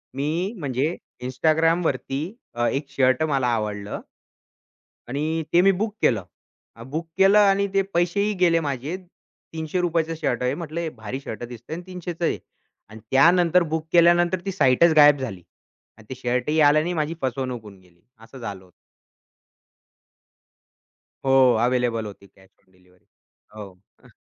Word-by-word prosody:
मी 165 +9 -2
म्हणजे 140 +3 -1 0.3
Instagramवरती 155 0 +1 0.4
अ, 120 - +2
एक 140 +1 -2
शर्ट 130 0 +2
मला 135 -3 +1
आवडलं 105 -2 -4 1.1
आणि 155 +4 -2
ते 175 - +6
मी 195 +1 +5
बुक 210 +3 -2
केलं. 105 -6 +2 0.5
अ, 115 - -11
बुक 155 +6 -5
केलं 195 +2 +6
आणि 200 -1 +3
ते 195 - +3
पैसेही 190 +5 +1
गेले 165 -2 +4
माझे. 145 +2 -3 0.6
₹300 165 0 -1
शर्ट 125 - -1
आहे 125 +2 +1
म्हंटल 165 -1 -7
हे 170 -1 -2
भारी 110 +5 -6
शर्ट 120 -3 -7
दिसतंय 120 +5 -8
अन् 175 - -7
300 180 -2 -7
आहे 170 - +1 0.5
अन् 110 +1 -11
त्यानंतर 170 +4 +5
बुक 160 0 -2
केल्यानंतर 175 +1 +4
ती 195 - -2
साइटच 160 0 +4
गायब 145 -1 +7
झाली 100 -9 -5 0.6
आणि 110 - -17
ते 130 - -5
शर्ट 125 +1 -2
ही 155 +1 +1
आलं 150 +1 +5
नाही. 175 +2 -2
माझी 155 0 -1
फसवणूक 130 -2 -3
होऊन 100 -3 -14
गेली, 90 -1 -26 0.2
असं 115 +4 -13
झालं 100 -5 -7
होतं. 90 - -24 2.5
हो, 135 -2 +5
अवेलेबल 120 -3 0
होती 100 -1 -11
कॅश 95 0 -23
ऑन 95 - -34
डिलिव्हरी, 90 0 -28 0.5
हो. 100 -2 -14
145 Hz, 150 wpm, -23 LUFS, 120-170 Hz, 2.5 s, गायब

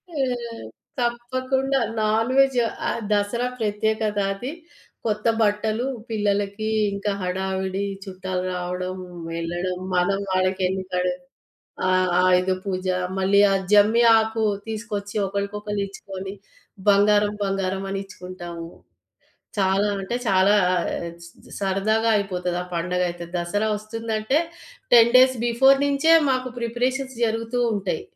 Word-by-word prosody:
ఆ! - - -4 0.8
తప్పకుండా 255 +3 0 0.2
non 220 +3 +1
veg 270 -2 +4 0.3
ఆహ్, - - -2
దసరా 210 +4 +1
ప్రత్యేకతది. 210 +1 -1 0.5
కొత్త 215 -1 -1 0.2
బట్టలు, 215 +3 +1 0.2
పిల్లలకి 205 0 -1 0.2
ఇంకా 200 +1 -2
హడావిడి 190 +1 -2 0.2
చుట్టాలు 185 -1 -4
రావడం 180 +1 -4 0.4
ఎళ్ళడం 175 +2 -3 0.2
మనం 195 +2 +2
వాళ్ళకింక‌డ్ 185 -1 0 0.8
ఆ! - - +2 0.3
ఆయుద 185 0 +3
పూజ 185 -1 -3 0.3
మళ్ళీ 195 +1 +3
ఆ 195 - +3 0.2
జమ్మి 210 +3 +5
ఆకు 220 0 0 0.2
తీసుకొచ్చి 210 -2 -5
ఒకళ్ళకొకళ్ళు 200 +1 -3
ఇచ్చుకొని 195 0 -8 0.6
బంగారం, 205 +1 +4
బంగారం 195 -1 -1
అని 195 - -2
ఇచ్చుకుంటాము. 175 -3 -8 0.9
చాలా 195 +1 +2
అంటే 195 +5 -3
చాలా 190 +1 +4 0.2
ఆహ్, 175 - 0 0.7
సరదాగా 205 +4 +1
అయిపోతది 180 -3 -2
ఆ - - -10
పండగ 180 +2 -1
అయితే 170 0 -7
దసరా 205 +5 -1
ఒస్తుందంటే 220 +3 -2 0.6
10 255 +2 +7
బిఫోర్ 265 +3 +5
నుంచే 285 +4 +4 0.2
మాకు 255 0 -1
ప్రిపరేషన్స్ 255 +3 -2
జరుగుతూ 230 +2 -2 0.2
ఉంటయి. 190 -5 -2
205 Hz, 105 wpm, -23 LUFS, 190-225 Hz, 0.9 s, 10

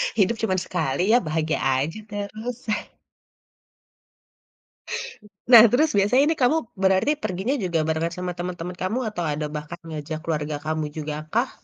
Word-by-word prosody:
Hidup 220 +2 +2
cuman 205 -4 +1
sekali 175 +2 0
ya, 245 - +6
bahagia 155 -2 -1
aja 135 +9 0
terus. 215 +4 -6 2.8
Nah, 235 -2 +11
terus 305 +5 +4
biasanya 225 +8 +4
ini 325 - +2
kamu 285 +6 +4 0.2
berarti 190 +7 +3
perginya 190 +10 -1
juga 170 -3 0
berangkat 165 +1 -1
sama 180 0 -3
teman-teman 180 0 -5
kamu, 210 +7 -1
atau 175 -4 -4
ada 150 +1 -2
bahkan 150 +3 -6
ngajak 155 0 -5
keluarga 150 -2 -2
kamu 155 0 -1
jugakah? 155 - -2
180 Hz, 135 wpm, -24 LUFS, 155-220 Hz, 2.8 s, Nah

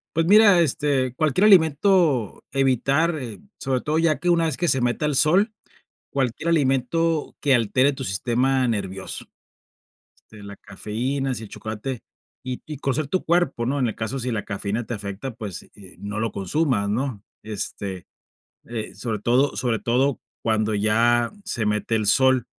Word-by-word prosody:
Pues 165 0 +2
mira, 205 -2 +7
este, 135 -4 0
cualquier 155 +7 +2
alimento 160 - +3
evitar, 135 +4 +1
eh, 120 -5 -6 0.2
sobre 130 -2 -1
todo, 155 +1 -1
ya 160 -4 +2
que 175 +3 -1
una 170 -1 +3
vez 160 - -1
que 175 - 0
se 130 -3 +3
meta 125 +5 0
el 150 - -1
sol, 190 - +3 0.6
cualquier 135 +4 -1
alimento 155 +2 +1
que 140 -2 +3
altere 130 +4 +2
tu 135 0 -6
sistema 125 +5 +1
nervioso. 95 -4 -4 1.0
Este, 105 -2 -12
la 100 0 -9
cafeína, 125 +8 -3
así, 115 -3 -4
el 105 - -10
chocolate 110 +3 -6 0.4
y 130 -1 -5
y 155 -2 -7
conocer 140 +2 -1
tu 185 +6 -1
cuerpo, 170 -8 +1
¿no? 140 +3 -1
En 125 - +1
el 110 - -4
caso 115 +4 -3
si 125 0 -2
la 110 -3 -2
cafeína 105 +3 -3
te 120 - -5
afecta, 100 +4 -5
pues, 105 -6 -7
eh, 95 -3 -14
no 100 +1 -5
lo 115 -1 -1
consumas, 100 - 0
¿no? 115 -1 -2 0.2
Este, 100 -3 -5 0.6
eh, 115 -4 -6
sobre 110 +2 -3
todo 125 +6 +2
sobre 120 -3 0
todo 130 +4 +1 0.2
cuando 110 -1 +1
ya 115 +3 +2
se 120 - -2
mete 105 +1 0
el 110 - -1
sol, 130 +2 +4
125 Hz, 165 wpm, -23 LUFS, 110-145 Hz, 1.0 s, mira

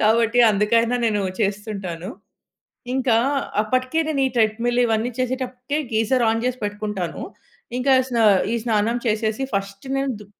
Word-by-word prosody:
కాబట్టి 230 +2 +3
అందుకైనా 230 +4 +2
నేను 210 -2 0 0.2
చేస్తుంటాను. 195 -3 -3 0.9
ఇంకా 255 -4 +2 0.5
అప్పటికే 255 +7 0
నేను 285 -3 0
ఈ - - -3
థ్రెడ్‌మిల్ 230 +2 +1
ఇవన్నీ 225 +2 0
చేసేటప్పటికే 255 +2 -2 0.2
గీజర్ 230 +3 +2
ఆన్ 225 +1 0
చేసి 255 0 -2
పెట్టుకుంటాను 205 -3 -4 0.6
ఇంకా 265 +1 +3 0.2
స్నా 235 -2 +1 0.3
ఈ - - 0
స్నానం 225 +1 +1
చేసేసి 220 +3 0
ఫస్ట్ 200 0 -3
నేను 275 0 0
దు 210 - -12
225 Hz, 135 wpm, -22 LUFS, 210-250 Hz, 0.9 s, కాబట్టి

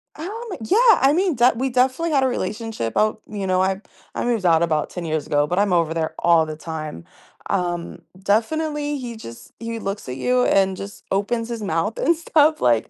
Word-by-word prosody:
Um, 405 +9 -6 0.2
yeah, 445 - +5
I 270 +2 +4
mean, 360 -1 +1
de 240 +1 +4
we 260 +3 -1
definitely 260 +6 +1
had 275 -3 +3
a - - +3
relationship 215 - -3
out 215 0 +1
you 205 -2 -4
know, 185 0 +2
I 190 +1 0 0.3
I - - -2
moved 230 -5 0
out 165 -2 +4
about 155 -3 0
10 175 -2 -6
years 155 -2 -2
ago, 145 0 +1
but 180 - -2
I'm 200 -1 +2
over 165 -2 +2
there 160 -1 -2
all 170 -2 +4
the 155 -1 -7
time, 155 - -6 0.4
um 175 -2 -2 0.2
definitely, 295 +8 0
he 240 -2 -6
just 115 - -11
he 230 0 -5
looks 195 -8 -5
at 125 - -5
you 250 - +2
and 190 -1 +3
just 200 +2 -9
opens 225 +4 0
his 235 -2 -5
mouth 195 +4 -1
and 335 - +2
stuff, 315 -1 +3
like, 115 -2 +2
210 Hz, 205 wpm, -22 LUFS, 170-255 Hz, 0.4 s, yeah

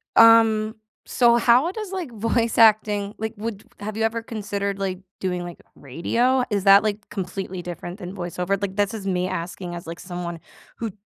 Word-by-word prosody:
um 220 -1 +6 0.3
so 235 -1 +4
how 250 +9 +4
does, 425 -2 -6
like, 365 -8 -4
voice 230 +1 0
acting 210 -2 +4
like, 220 +1 -4
would 210 -1 -5 0.2
have 210 +1 -5
you 225 - 0
ever 230 +1 0
considered, 200 -3 -3
like, 190 -2 -3 0.2
doing, 180 -2 -2
like, 175 -1 -8
radio? 235 - 0
Is 200 -1 0
that, 195 +1 +8
like, 210 -1 -3
completely 185 -1 -5
different 175 +1 -7
than 185 -2 -7
voice-over? 180 +1 -2
Like, 195 -1 -4
this 205 +2 +1
is 200 -3 -5
me 180 -1 0
asking 175 0 -5
as, 170 -1 -8
like, 170 0 -7
someone 175 -2 -6 0.4
who 225 -2 -4
205 Hz, 180 wpm, -23 LUFS, 180-225 Hz, 0.4 s, that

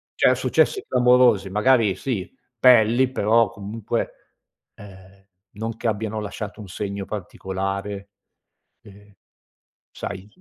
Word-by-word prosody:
Cioè, - - +4
successi 395 - +1
clamorosi 125 -5 +4
magari 105 -1 +3
sì 115 -9 -4 0.3
pelli 125 +1 +5
però, 115 -1 +3
comunque, 110 +1 -4 0.6
ehm, 95 -1 -15 0.3
non 110 +2 -5
che 115 - -3
abbiano 110 0 -2
lasciato 105 0 -6
un 100 - -10
segno 100 +1 -5
particolare, 100 0 -5 0.7
ehm, 105 0 -17 0.8
sai 95 +2 -7
105 Hz, 105 wpm, -23 LUFS, 100-115 Hz, 0.8 s, pelli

